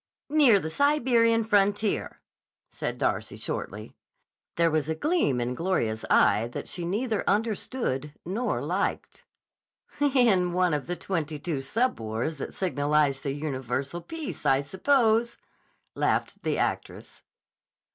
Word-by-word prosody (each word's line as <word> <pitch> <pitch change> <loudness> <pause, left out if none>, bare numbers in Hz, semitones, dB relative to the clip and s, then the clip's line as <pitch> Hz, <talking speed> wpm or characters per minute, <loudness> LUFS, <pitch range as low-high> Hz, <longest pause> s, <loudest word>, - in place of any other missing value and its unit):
"Near 285 -9 +6
the 160 -3 -4
Siberian 235 - +3
frontier," 205 0 +1 0.5
said - - -4
Darcy - - -1
shortly. - - -5 0.6
There 165 -1 +3
was 155 -1 0
a 160 - 0
gleam 300 - +1
in 120 +1 -1
Gloria's 125 -9 -1
eye 115 +3 +4
which - - -6
she 175 -1 -4
neither 215 +4 -1
understood 205 - -1
nor 200 - -2
liked. 180 +6 -3 0.7
"In 240 -11 +3
one 180 -2 +2
of 145 -2 -2
the 175 - -2
twenty 160 -5 -3
two 145 -2 -3
sub 230 - 0
wars 115 +7 -3
that - - -6
signalize 145 -5 +1
the 140 - -3
universal 140 +1 -3
peace, 325 - -6
I 135 +1 +3
suppose," 230 - +2 0.6
laughed - - -1
the - - -1
actress. - - -3
180 Hz, 125 wpm, -27 LUFS, 145-230 Hz, 0.7 s, Near